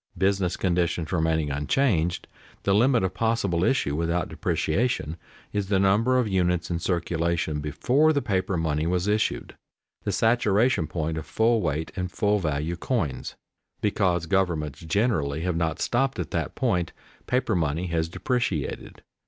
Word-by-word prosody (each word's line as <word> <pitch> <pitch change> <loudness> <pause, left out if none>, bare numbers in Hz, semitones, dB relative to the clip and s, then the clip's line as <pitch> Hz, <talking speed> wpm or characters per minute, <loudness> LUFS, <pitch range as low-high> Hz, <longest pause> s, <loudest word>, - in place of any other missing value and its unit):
Business 95 -2 +1
conditions 85 -3 0
remaining 80 -3 +1
unchanged, 85 - +1 0.4
the 100 - +2
limit 120 +2 +4
of 95 0 -1
possible 100 -5 0
issue 95 - +1
without 85 +1 -1
depreciation 85 -3 -1 0.4
is 100 -2 -1
the 100 -1 +2
number 105 +7 +3
of 125 -3 +2
units 90 -3 0
in 85 - -1
circulation 85 -3 -1
before 125 - +2
the 145 - +2
paper 95 -6 -1
money 80 -1 0
was 90 +1 0
issued, 105 0 0 0.5
the 100 - -1
saturation 110 -2 +2
point 80 0 -2
of 80 - -8
full 115 0 +2
weight 80 -1 -2
and 90 -1 -3
full 105 +1 +1
value 75 0 -1
coins. 80 - -2 0.4
Because 95 -5 +1
governments 80 -6 0
generally 80 - 0
have 90 0 -1
not 80 -1 -1
stopped 135 +2 0
at 85 -4 -4
that - - -2
point, 90 -2 0 0.3
paper 125 -3 +1
money 80 -1 0
has 80 -2 -1
depreciated. 100 - -2
90 Hz, 145 wpm, -25 LUFS, 80-105 Hz, 0.5 s, limit